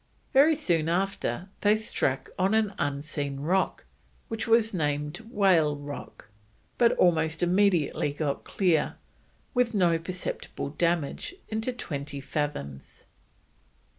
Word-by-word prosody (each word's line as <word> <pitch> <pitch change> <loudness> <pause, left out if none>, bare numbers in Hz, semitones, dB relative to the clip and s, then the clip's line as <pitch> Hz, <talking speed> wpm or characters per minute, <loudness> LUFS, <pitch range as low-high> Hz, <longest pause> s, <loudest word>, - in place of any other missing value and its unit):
Very 295 +4 +6
soon 170 - +1
after 185 -3 -1
they 210 +1 +5
struck 180 -11 -1
on 190 +3 +3
an 215 -2 +2
unseen 145 -1 -2
rock, 185 +6 0 0.4
which 225 0 -3
was 225 -1 +4
named 150 -2 -1
Whale 180 -9 +3
Rock, 145 -6 -9 0.5
but 235 -1 +5
almost 165 -1 +2
immediately 175 -5 +2
got 145 -1 -2
clear, 175 -6 +1 0.6
with 245 -3 +1
no 170 -4 +3
"perceptible 180 -4 -5
damage," 170 - -1
into 220 +3 -1
twenty 145 - -5
fathoms. 135 - -5
170 Hz, 110 wpm, -27 LUFS, 145-205 Hz, 0.6 s, Very